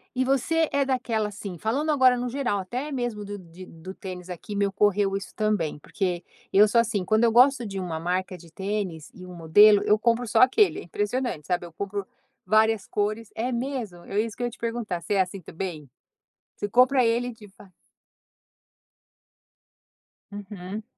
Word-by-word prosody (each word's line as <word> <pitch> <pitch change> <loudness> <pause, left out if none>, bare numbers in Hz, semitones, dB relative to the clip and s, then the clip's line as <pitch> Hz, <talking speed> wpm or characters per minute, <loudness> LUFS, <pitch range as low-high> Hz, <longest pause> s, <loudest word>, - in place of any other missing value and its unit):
E 260 +1 +1
você 305 +5 +2
é 280 0 +2
daquela, 245 -5 -1
assim 200 -3 -7
falando 280 - 0
agora 260 -4 +5
no 245 - -2
geral, 245 -4 -1
até 250 +10 -4
mesmo 240 -6 -3
do 205 0 -6
de 180 0 -12
do 165 +3 -10
tênis 185 -3 -8
aqui, 180 +4 -7
me 200 0 +1
correu 200 -1 +2
isso 195 -1 -6
também. 210 -9 0
Porque 180 +2 -3 0.3
eu 210 +2 +6
sou 230 +2 +4
assim, 210 -5 -2
quando 215 +4 +2
eu 230 - +4
gosto 250 +1 +5
de 195 -2 -5
uma 170 -4 -4
marca 185 +2 -2
de 170 -2 -15
tênis 190 -4 -4
e 185 - -11
um 180 - -10
modelo, 200 +6 +6
eu 210 - +4
compro 235 +1 +1
só 225 0 +2
aquele. 260 +11 +4
É - - -8
impressionante, 205 - -2
sabe, 175 -1 -1
eu 165 - -16
compro 200 +2 -4 0.4
várias 220 -1 +3
cores 215 +2 -2
é 245 +3 -2
mesmo? 235 -8 -4
É 200 - -2
isso 220 -1 -2
que 245 - -5
eu 240 - 0
te 235 - -14
perguntar, 230 -7 -3
você 200 - -1
assim 190 +1 0
também? 160 -4 -6 0.7
Você 205 - -4
compra 255 +3 +4
ele 240 +2 +1
de 215 -3 -14
va 195 - -15 2.6
Uhum. 205 0 -7
210 Hz, 180 wpm, -25 LUFS, 185-240 Hz, 2.6 s, eu